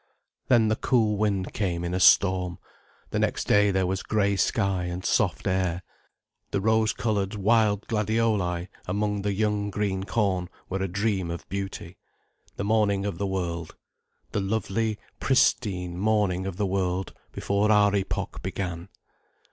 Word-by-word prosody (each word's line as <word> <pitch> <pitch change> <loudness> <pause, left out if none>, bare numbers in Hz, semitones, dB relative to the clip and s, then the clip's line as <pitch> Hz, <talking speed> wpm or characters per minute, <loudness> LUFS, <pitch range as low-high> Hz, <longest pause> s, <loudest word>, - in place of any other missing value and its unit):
Then 115 -3 +4
the 110 - +2
cool 110 -3 +2
wind 100 -3 -1
came 90 -4 -1
in 85 0 -3
a 90 - 0
storm, 90 -1 +4 0.5
the - - 0
next - - 0
day 105 0 +4
there 95 -1 +1
was 95 +1 -1
grey 100 -2 +1
sky 95 -2 +1
and 90 +1 -5
soft - - +1
air. 90 -1 0 0.7
The - - -1
rose 110 +2 +2
coloured 105 -2 -1
wild 105 0 +2
gladioli 105 -5 0 0.2
among 105 +2 -1
the 100 +1 -1
young 105 0 0
green 100 -2 -1
corn 95 -5 0 0.2
were 95 +1 -2
a 95 - 0
dream 100 -1 -1
of 85 0 -6
beauty, 95 -3 -5 0.6
the - - -3
morning 100 -2 +2
of 95 -4 -3
the 100 - 0
world. 85 -4 -3 0.6
The 105 - -1
lovely, 110 +1 -1 0.2
pristine 90 -9 +1
morning 100 -3 +1
of 95 -2 -5
the 105 - 0
world, 95 -1 -1 0.2
before 100 +2 +1
our 105 -1 +5
epoch 95 -1 -3
began. 90 -1 -4
100 Hz, 150 wpm, -26 LUFS, 95-105 Hz, 0.7 s, our